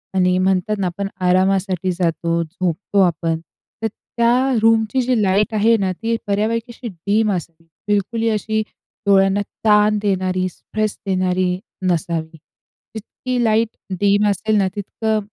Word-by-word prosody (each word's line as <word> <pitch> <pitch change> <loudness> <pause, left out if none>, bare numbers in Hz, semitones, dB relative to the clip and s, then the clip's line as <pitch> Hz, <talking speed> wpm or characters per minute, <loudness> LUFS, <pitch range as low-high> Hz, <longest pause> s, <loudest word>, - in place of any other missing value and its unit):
आणि 180 -1 +3
म्हणतात 190 +2 +1
ना 190 - 0
आपण 195 +3 -3 0.2
आरामासाठी 185 0 +2
जातो, 170 -1 0
झोपतो 180 +4 -1
आपण. 165 -2 0 0.4
तर 225 - +3
त्या 235 +2 0 0.3
रूमची 225 +3 +3
जी 250 -2 +1
लाईट 200 +4 +2
आहे 220 +2 +4
ना 190 -1 0
ती 230 0 0
बऱ्यापैकी 220 +4 -1
अशी 240 - -7
डिम 205 +4 0
असते, 165 -2 -5 0.2
बिलकुल 205 +3 0
ही 230 - +2
अशी 220 0 0 0.5
डोळ्यांना 195 0 +4 0.2
ताण 210 0 +5
देणारी 185 -2 0
स्ट्रेस 215 +4 -4
देणारी 185 -1 0 0.3
नसावी, 165 -2 -2 0.6
जितकी 245 +3 -3
लाईट 225 0 +2 0.3
डिम 205 +1 +3
असेल 210 +2 0
ना 195 -2 +3
तितकं 215 +2 -1
200 Hz, 135 wpm, -20 LUFS, 185-220 Hz, 0.6 s, ताण